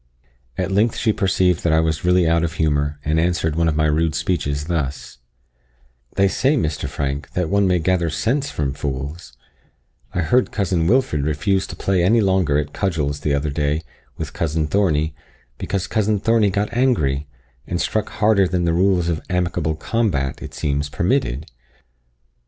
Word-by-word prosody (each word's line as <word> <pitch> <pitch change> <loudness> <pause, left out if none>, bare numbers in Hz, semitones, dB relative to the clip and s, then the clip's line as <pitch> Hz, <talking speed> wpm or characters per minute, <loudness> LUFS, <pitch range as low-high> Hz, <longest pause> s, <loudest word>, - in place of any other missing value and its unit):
At 95 +1 -1
length 105 +4 +2
she 110 -2 +1
perceived 95 -3 +1
I 80 -1 +4
was 80 -1 0
really 90 -1 +3
out 85 0 +2
of 80 -1 -1
humour, 75 -2 0
and 80 +1 +1
answered 80 -2 0
one 85 0 +2
of 80 - +1
my 75 0 +2
rude 80 +1 +1
speeches 75 -5 -1
thus: 75 -6 -3 1.0
"They 100 0 +4
say, 135 +9 +1
Mr. 75 - -2
Frank, 70 +1 -3
that 90 -3 -1
one 100 -1 +3
may 90 -1 +3
gather 85 0 +1
sense 135 - -1
from 70 - -2
fools 70 0 -5 0.8
I 90 - -1
heard 120 +10 +2
cousin 90 -5 0
Wilfred 115 - +2
refuse 80 +6 0
to - - -8
play 95 -3 +1
any 110 +6 +4
longer 95 -8 +2
at 75 -1 -2
cudgels 75 -7 -1
the 70 -1 0
other 70 +1 -1
day 75 +1 -1 0.3
with - - -5
cousin 80 -1 -1
Thornie, 80 -3 +1 0.5
because 95 -2 -2
cousin 105 -1 0
Thornie 115 0 +3
got 105 +3 -1
angry, 75 - +1 0.4
and 85 - -2
struck 110 +3 -1
harder 105 -3 +3
than 90 -1 0
the 85 - +2
rules 90 -1 +2
of 80 -2 -1
amicable 90 -3 0
combat, 80 - -1
it - - -8
seems, 70 0 -1
permitted. 85 - 0
85 Hz, 170 wpm, -21 LUFS, 75-95 Hz, 1.0 s, I